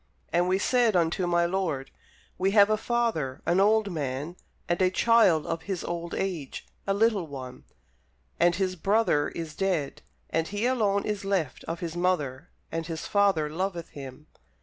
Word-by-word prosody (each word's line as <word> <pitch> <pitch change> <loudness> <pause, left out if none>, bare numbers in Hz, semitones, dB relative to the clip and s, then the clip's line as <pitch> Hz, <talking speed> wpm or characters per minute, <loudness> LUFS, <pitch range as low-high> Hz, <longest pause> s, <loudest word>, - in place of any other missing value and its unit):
And 175 +1 +3
we 185 +1 +2
said 235 +1 +2
unto 175 +1 +1
my 175 0 +3
lord, 170 -7 -2 0.5
We 190 +1 +2
have 205 +1 +7
a - - +4
father, 220 - -1
an 175 - +2
old 210 0 +3
man, 145 +1 -3 0.3
and 175 +2 0
a 185 - +5
child 185 -6 +4
of 165 0 -3
his 190 -3 -2
old 170 0 -4
age, 175 -8 -4 0.2
a 195 - +2
little 210 -5 +2
one; 130 -3 -9 0.7
and 175 0 +4
his 185 0 -1
brother 195 -5 +2
is 165 -2 -6
dead, 180 -8 -1 0.3
and 165 0 0
he 205 +3 -2
alone 210 -6 +1
is 210 -2 -2
left 190 -9 -1
of 165 +1 -5
his 170 -1 -4
mother, 175 -5 -1 0.2
and 165 0 -3
his 165 -2 -5
father 200 -7 +2
loveth 170 +2 -3
him. 140 +1 -10
175 Hz, 170 wpm, -27 LUFS, 160-200 Hz, 0.7 s, have